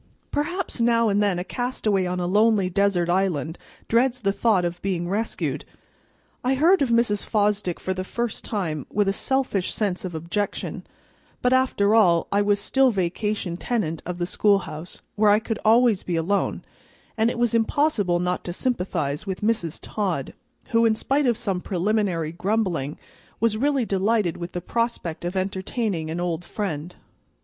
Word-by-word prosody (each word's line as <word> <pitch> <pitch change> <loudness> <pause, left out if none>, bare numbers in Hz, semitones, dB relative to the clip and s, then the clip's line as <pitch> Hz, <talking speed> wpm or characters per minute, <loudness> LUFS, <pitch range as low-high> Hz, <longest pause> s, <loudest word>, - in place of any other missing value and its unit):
Perhaps 340 -1 -2
now 230 -1 +3
and 205 0 +2
then 200 -3 +2
a 180 - -2
castaway 215 -5 -1
on 180 0 -2
a 175 - -1
lonely 205 0 +3
desert 195 -2 +2
island 175 -4 0 0.3
dreads 250 +2 +2
the 200 -2 +2
thought 200 -3 +2
of 175 0 -4
being 180 -3 -1
rescued. 210 +5 -2 0.8
I 260 +2 +2
heard 335 +7 +4
of 270 - +2
Mrs. 230 -3 +2
Fosdick 205 -4 0
for 190 - -2
the 185 0 -4
first 235 +3 -3
time 165 - -3
with 205 -1 +1
a 195 - +2
selfish 260 -5 0
sense 200 -4 -1
of 180 -3 -5
objection; 170 +6 -3 0.6
but 250 +1 +3
after 255 -6 +3
all, 180 -7 +5
I 200 - +3
was 205 0 +2
still 265 +5 +3
vacation 190 -2 -2
tenant 175 -9 -2
of 180 0 -5
the 175 - -1
schoolhouse, 180 -4 0
where 210 0 +5
I 205 - +6
could 220 0 -3
always 225 -2 +4
be 175 - -3
alone, 180 +5 0 0.5
and 225 +1 +2
it - - -4
was 240 -1 +1
impossible 225 - +2
not 180 +1 -1
to 175 - -4
sympathize 180 - -2
with 190 -1 -4
Mrs. 210 -7 0
Todd, 185 -10 -3 0.4
who, 230 0 +3
in 225 -1 +4
spite 275 +5 +1
of 235 -3 +2
some 185 -3 -2
preliminary 185 -4 0
grumbling, 180 -6 -1 0.4
was 225 -1 +2
really 275 +1 +1
delighted 200 -2 +1
with 170 0 -7
the 175 - -3
prospect 230 -6 -2
of 175 +2 -3
entertaining 190 -2 -2
an 165 +2 -3
old 175 -1 -2
friend. 175 -4 -4
200 Hz, 170 wpm, -24 LUFS, 175-230 Hz, 0.8 s, I